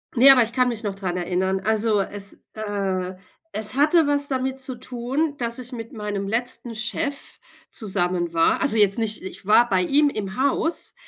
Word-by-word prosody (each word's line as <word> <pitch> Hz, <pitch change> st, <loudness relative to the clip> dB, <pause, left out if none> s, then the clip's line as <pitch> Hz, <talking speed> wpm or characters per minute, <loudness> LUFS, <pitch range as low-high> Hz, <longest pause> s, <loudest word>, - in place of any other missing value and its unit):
Ne, 255 Hz, +3 st, +7 dB
aber 255 Hz, -3 st, +6 dB
ich 225 Hz, -, -4 dB
kann 250 Hz, 0 st, +2 dB
mich 235 Hz, -2 st, -3 dB
noch 205 Hz, -2 st, -2 dB
daran 190 Hz, -3 st, -3 dB
erinnern. 185 Hz, +2 st, -1 dB
Also 220 Hz, -1 st, +1 dB
es 200 Hz, 0 st, -4 dB, 0.2 s
äh, 195 Hz, -4 st, -3 dB, 0.4 s
es 215 Hz, +3 st, +3 dB
hatte 300 Hz, +3 st, +4 dB
was 285 Hz, 0 st, +3 dB
damit 265 Hz, 0 st, -2 dB
zu 260 Hz, -1 st, -3 dB
tun, 255 Hz, +5 st, -3 dB
dass 235 Hz, -1 st, -3 dB
ich 250 Hz, +1 st, -7 dB
mit 230 Hz, -2 st, -7 dB
meinem 205 Hz, -2 st, -4 dB
letzten 240 Hz, +2 st, -3 dB
Chef 275 Hz, +5 st, -4 dB, 0.3 s
zusammen 180 Hz, -5 st, -2 dB
war. 165 Hz, 0 st, +2 dB
Also 275 Hz, -5 st, +3 dB
jetzt 205 Hz, +1 st, +4 dB
nicht 215 Hz, -1 st, 0 dB
ich 190 Hz, -, -9 dB
war 235 Hz, +4 st, +5 dB
bei 185 Hz, -3 st, +2 dB
ihm 290 Hz, +9 st, +3 dB
im 200 Hz, -7 st, -5 dB
Haus, 280 Hz, +5 st, -1 dB
220 Hz, 185 wpm, -23 LUFS, 195-260 Hz, 0.4 s, Ne